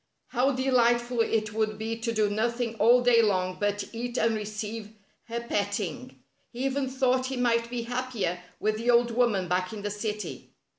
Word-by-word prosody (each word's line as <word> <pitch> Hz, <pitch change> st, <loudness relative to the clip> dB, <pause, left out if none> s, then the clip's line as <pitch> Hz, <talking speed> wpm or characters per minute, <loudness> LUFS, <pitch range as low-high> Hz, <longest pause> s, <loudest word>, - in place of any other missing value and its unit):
How 260 Hz, +2 st, +2 dB
delightful 245 Hz, -2 st, +2 dB
it 215 Hz, -1 st, 0 dB
would 215 Hz, -1 st, 0 dB
be 225 Hz, +1 st, -3 dB
to 230 Hz, +1 st, -3 dB
do 215 Hz, -2 st, +2 dB
nothing 230 Hz, +3 st, -1 dB
all 240 Hz, +3 st, +6 dB
day 240 Hz, -1 st, +6 dB
long 185 Hz, -4 st, +1 dB
but 205 Hz, 0 st, 0 dB
eat 240 Hz, +2 st, -4 dB
and 230 Hz, -, +2 dB
receive 215 Hz, 0 st, -5 dB, 0.3 s
her 235 Hz, 0 st, -3 dB
pet 205 Hz, -4 st, -1 dB
ting! 215 Hz, +6 st, -4 dB, 0.3 s
He 250 Hz, +2 st, -4 dB
even 270 Hz, 0 st, 0 dB
thought 260 Hz, -1 st, +1 dB
he 265 Hz, -1 st, -3 dB
might 235 Hz, -1 st, +1 dB
be 240 Hz, -1 st, -3 dB
happier 240 Hz, -7 st, -2 dB, 0.2 s
with 215 Hz, 0 st, 0 dB
the 230 Hz, +2 st, -2 dB
old 235 Hz, 0 st, +4 dB
woman 225 Hz, -6 st, +2 dB
back 180 Hz, +2 st, 0 dB
in 205 Hz, -2 st, -7 dB
the 205 Hz, -, -2 dB
city. 210 Hz, 0 st, -5 dB
230 Hz, 185 wpm, -27 LUFS, 210-245 Hz, 0.3 s, all